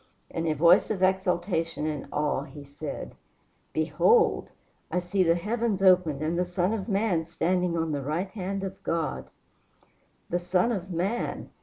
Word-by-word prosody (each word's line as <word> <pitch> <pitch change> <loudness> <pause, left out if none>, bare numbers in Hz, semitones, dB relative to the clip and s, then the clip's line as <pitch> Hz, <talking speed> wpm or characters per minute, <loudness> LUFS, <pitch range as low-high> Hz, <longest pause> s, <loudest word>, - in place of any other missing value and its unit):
In 165 0 -2
a 155 - +2
voice 170 +5 +5
of 195 -4 -1
exultation 180 -4 0
and 150 -3 -3
awe 150 -2 0
he 140 +1 -10
said: 145 +1 -7 0.6
"Behold! 460 0 +3 0.4
I - - -1
see 180 +2 0
the 170 -2 +4
heavens 210 +2 -1
opened 180 -6 +4
and 165 +3 0
the - - +3
Son 180 +3 0
of 220 0 -4
man 195 -5 +1
standing 175 +1 0
on 165 -1 -1
the 145 -1 -2
right 165 +8 -2
hand 195 -1 -4
of 190 0 -6
God." 150 - -2 1.0
The 175 - +1
Son 180 +6 +1
of 190 -4 -3
man! 190 +7 -2
175 Hz, 160 wpm, -27 LUFS, 160-190 Hz, 1.0 s, voice